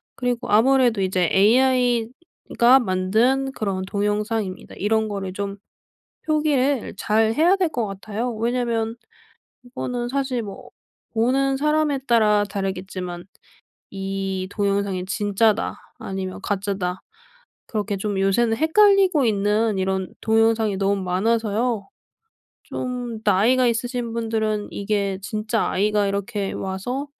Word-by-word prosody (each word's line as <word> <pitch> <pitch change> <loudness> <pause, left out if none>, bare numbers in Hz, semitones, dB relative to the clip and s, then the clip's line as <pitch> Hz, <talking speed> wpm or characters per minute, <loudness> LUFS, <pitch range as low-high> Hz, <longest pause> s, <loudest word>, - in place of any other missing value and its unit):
그리고 245 -1 -2
아무래도 240 0 +4
이제 185 -2 +1
'AI가 245 - +3
만든 230 +7 +1
그런 195 -6 -3
동영상입니다.' 210 0 -2
이런 220 +2 +1
거를 195 -3 -4
좀 200 0 -4 0.7
표기를 285 -5 +1
잘 220 +1 +2
해야 345 +8 +4
될 365 -3 +1
것 235 -7 -2
같아요. 215 +5 -4
왜냐하면 230 -1 -1 0.7
이거는 245 -1 -4
사실 265 -2 -1
뭐 200 -2 -9 0.4
보는 270 +4 +2
사람에 300 -1 +1
따라 210 -3 +4
다르겠지만 185 -3 -4 0.7
이 195 -1 -3
동영상이 200 -3 -1
진짜다 205 +2 +1 0.2
아니면 190 -1 -5
가짜다 195 -2 -2 0.7
그렇게 210 -2 -2
좀 200 0 -2
요새는 225 +4 +2
헷갈리고 380 - +4
있는 210 0 +1
이런 190 -1 -2
동영상이 225 -1 +2
너무 195 0 0
많아서요. 220 +3 0 0.8
좀 245 -3 -5
나이가 225 +6 +3
있으신 235 0 -2
분들은 220 -2 -1
이게 200 -1 -1
진짜 215 +2 -1
아이가 205 +1 +1
이렇게 200 0 -2
와서 195 +9 -4
220 Hz, 265 characters per minute, -22 LUFS, 195-245 Hz, 0.8 s, 아무래도